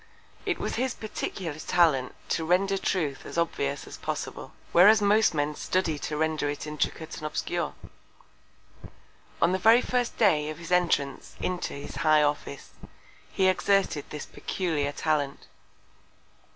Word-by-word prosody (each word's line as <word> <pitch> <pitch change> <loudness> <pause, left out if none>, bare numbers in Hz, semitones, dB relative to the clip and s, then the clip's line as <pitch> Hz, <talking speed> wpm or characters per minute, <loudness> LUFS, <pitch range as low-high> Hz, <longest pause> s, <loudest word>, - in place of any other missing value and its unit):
It - - +1
was - - -3
his 255 +1 -1
peculiar 190 -5 -4
Talent 155 -8 +2
to 165 - 0
render 190 +4 +2
Truth 150 -10 -1
as - - -8
obvious 145 -4 -1
as - - -9
possible: - - -5 0.2
Whereas 205 +6 +7
most 210 -2 +3
Men 145 0 0
study 160 -1 -1
to 150 - -4
render 155 -1 0
it 145 0 -4
intricate 150 +1 -3
and 155 - -4
obscure. - - -3 1.7
On 170 - +4
the 190 - 0
very 225 +5 +6
first 245 -1 -1
Day 155 -9 +3
of 155 - -6
his 170 +1 -9
Entrance 165 -6 +1
into 180 -1 -2
his 140 -1 -8
High 155 +1 +4
Office, 145 -1 -3 0.6
he 190 - +2
exerted 190 -5 +2
this 150 - -6
peculiar 155 -6 -2
Talent. 145 -2 -1
160 Hz, 140 wpm, -27 LUFS, 150-190 Hz, 1.7 s, Whereas